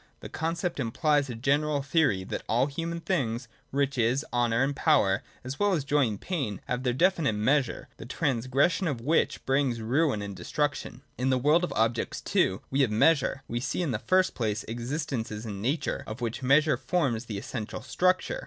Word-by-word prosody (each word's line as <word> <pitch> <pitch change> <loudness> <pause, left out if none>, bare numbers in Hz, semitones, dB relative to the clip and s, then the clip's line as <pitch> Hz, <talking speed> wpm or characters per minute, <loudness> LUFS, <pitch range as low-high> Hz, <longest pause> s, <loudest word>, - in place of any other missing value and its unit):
That - - -9
conception 165 -4 -2
implies 145 +3 +1
a 120 - -4
general 140 +4 +1
theory 145 - +2
that - - -4
all 120 +4 +3
human 165 +4 -4
things, 125 -10 -1 0.2
riches, 135 -1 +1
honour, 120 0 +2
and 140 +1 -1
power, 135 -12 +3 0.2
as 130 +2 -6
well 205 -1 +3
as 155 -6 0
joy 140 -1 +2
and 105 -2 -4
pain, 135 - -3
have 125 0 -2
their 125 -1 +1
definite 165 - +2
measure, 130 +6 +1
the - - -9
trans 130 -3 -1
gression 165 +8 +2
of 135 -5 -3
which 155 +7 +1
brings 135 -3 +1
ruin 120 0 +1
and 100 -1 -6
destruction. 145 0 -3 0.2
In 130 +1 +1
the 130 - +3
world 150 +7 +3
of 180 - -1
objects, 115 +1 0
too, 95 +1 +1
we 135 +1 +2
have 130 - +3
measure. 135 +4 +2
We 120 - -2
see, 155 +8 -2
in 155 - -1
the 110 - -1
first 185 +7 +2
place, 105 -3 -2
existences 120 -2 -4
in 100 -3 -5
Nature, 135 +8 -1
of 110 +3 -6
which 120 0 -3
measure 145 +4 +4
forms 130 -10 -1
the 110 -3 -5
essential 110 0 -5
structure. 185 - +1
135 Hz, 190 wpm, -28 LUFS, 115-150 Hz, 0.2 s, measure